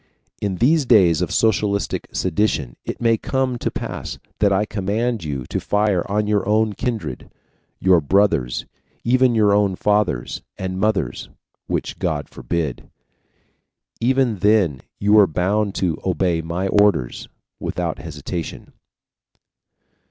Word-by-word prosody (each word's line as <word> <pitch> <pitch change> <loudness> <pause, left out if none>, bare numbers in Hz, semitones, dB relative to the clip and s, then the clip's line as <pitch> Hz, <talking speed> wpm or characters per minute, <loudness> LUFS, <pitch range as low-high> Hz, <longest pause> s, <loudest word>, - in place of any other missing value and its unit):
IN 100 -2 -1
THESE 145 - +3
DAYS 90 -9 +5
OF 90 - 0
SOCIALISTIC 105 -2 +1
SEDITION 95 - 0
IT - - -5
MAY 115 -1 +3
COME 130 0 -1
TO - - -1
PASS - - -5 0.2
THAT 100 -1 +3
I 100 +2 +2
COMMAND 105 +2 -1
YOU 70 -5 -4
TO - - -3
FIRE 105 -3 +1
ON 105 +1 +1
YOUR 105 -2 +1
OWN 110 0 +2
KINDRED, 115 0 -4 0.5
YOUR 90 -3 +4
BROTHERS, 80 -7 +1 0.4
EVEN 125 0 +3
YOUR 105 -2 +4
OWN 100 -2 +2
FATHERS 105 -11 0 0.2
AND 95 0 -4
MOTHERS 105 0 -1 0.4
WHICH - - -3
GOD - - -2
FORBID! 80 -7 -4 1.1
even 125 -2 +2
then 95 -9 +3 0.2
you 105 +1 +3
are 100 - +6
bound 100 +5 0
to 85 -4 -1
obey 90 -2 0
my 85 +4 -2
orders 100 -13 +2 0.3
without - - -3
hesitation." 80 +2 -6
100 Hz, 130 wpm, -21 LUFS, 90-110 Hz, 1.1 s, are